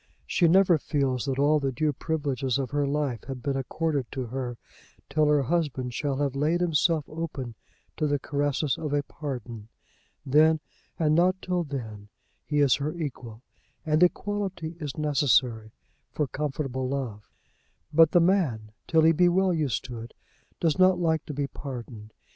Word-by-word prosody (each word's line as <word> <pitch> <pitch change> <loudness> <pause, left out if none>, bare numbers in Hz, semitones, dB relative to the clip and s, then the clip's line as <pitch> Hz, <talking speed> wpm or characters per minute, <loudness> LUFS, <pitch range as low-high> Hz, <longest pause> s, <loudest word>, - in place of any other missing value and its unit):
She 175 - +2
never 180 -1 +5
feels 135 -5 -1
that 135 -2 -2
all 150 +2 +4
the 135 -2 -1
due 150 +3 0
privileges 140 -4 -1
of 135 -3 -3
her 145 -1 +1
life 140 -4 -2
have 130 -2 -7
been 140 -1 -1
accorded 140 0 -1
to 130 -2 -3
her, 120 0 -4 0.5
till 155 -1 +3
her 150 -2 +3
husband 135 -5 -1
shall 140 +2 -1
have 140 -2 -1
laid 155 +5 +1
himself 165 -2 +2
open 150 -7 -5 0.4
to 155 - +1
the 145 0 +1
caresses 145 0 -1
of 150 -3 -3
a 145 0 +1
pardon. 120 -9 -7 0.6
Then, 155 +3 +4 0.4
and 155 -2 +2
not 180 +3 +3
till 180 -2 -1
then, 110 -8 -7 0.3
he 150 -1 0
is 135 -4 +4
her 150 +4 -3
equal; 125 -8 -6 0.4
and 155 0 +2
equality 185 -3 0
is 145 -4 -5
necessary 130 -7 +2 0.4
for 150 - 0
comfortable 135 -1 -3
love. 125 -7 -4 0.6
But 165 0 +7
the 175 - +4
man, 155 - +1 0.2
till 160 -1 +4
he 160 - +6
be 175 +2 +4
well 185 +1 +2
used 150 -10 -1
to 120 -2 -7
it, 115 +1 -10 0.4
does 165 +1 +1
not 185 -1 +5
like 160 -3 0
to 150 - -5
be 145 0 0
pardoned. 120 -6 -8
145 Hz, 165 wpm, -27 LUFS, 130-160 Hz, 0.6 s, But